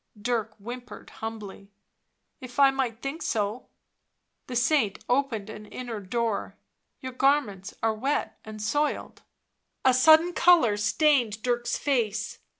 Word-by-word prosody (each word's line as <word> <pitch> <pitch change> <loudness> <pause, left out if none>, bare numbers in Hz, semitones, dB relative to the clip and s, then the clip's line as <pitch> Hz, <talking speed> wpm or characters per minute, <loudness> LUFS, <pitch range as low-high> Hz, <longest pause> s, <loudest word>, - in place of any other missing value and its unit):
Dirk 225 -1 -2
whimpered 245 +4 -9
humbly: 210 -3 -7 0.7
"If 255 -3 -11
I 275 -1 +7
might 255 -4 -3
think 280 +5 -4
so." 215 +2 -2 0.8
The 250 - -6
saint 245 -4 +1
opened 245 -5 0
an 215 -1 -9
inner 240 -2 -6
door. 220 +2 -2 0.2
" - - -52
Your 260 - -5
garments 250 -8 0
are 225 -1 +2
wet 270 +7 -2
and 215 0 -9
soiled." 290 +8 -2 0.6
A 260 - +6
sudden 315 +7 +6
colour 335 -13 +5
stained 220 0 +2
Dirk's 240 -1 0
face. 225 -5 -1
240 Hz, 130 wpm, -26 LUFS, 215-270 Hz, 0.8 s, I